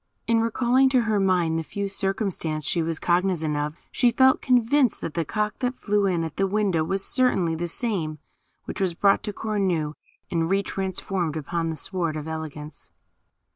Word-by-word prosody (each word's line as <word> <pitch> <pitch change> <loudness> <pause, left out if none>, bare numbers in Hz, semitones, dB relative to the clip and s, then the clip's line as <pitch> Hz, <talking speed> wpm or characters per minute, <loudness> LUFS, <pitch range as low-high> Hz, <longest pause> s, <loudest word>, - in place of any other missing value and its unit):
In 230 -1 +3
recalling 245 +3 +3
to 260 -2 +3
her 215 -2 +1
mind 175 -4 +2
the - - -3
few 200 +5 -4
circumstances 195 -6 -2
she 170 - +1
was 165 0 -1
cognizant 175 -4 +1
of, 150 +1 -2 0.2
she 245 - +3
felt 260 +2 +4
convinced 250 0 +3
that 160 - -4
the 170 - 0
cock 210 +6 -2
that 250 0 -1
flew 205 -1 +1
in 175 -3 0
at 160 -1 -6
the 195 - +2
window 195 -5 +1
was 195 +4 -2
certainly 235 -10 +2
the 170 +2 -2
same 170 -6 -2 0.5
which - - -5
was 180 -3 +1
brought 195 +2 +3
to 210 - -3
Cornue, 190 -8 -1 0.4
and 165 -1 0
re 195 +1 +2
transformed 185 -4 -2
upon 165 +2 -2
the 160 - -3
Sward 170 -1 -2
of 150 0 -6
Eloquence. 155 -1 -7
190 Hz, 180 wpm, -25 LUFS, 160-215 Hz, 0.5 s, felt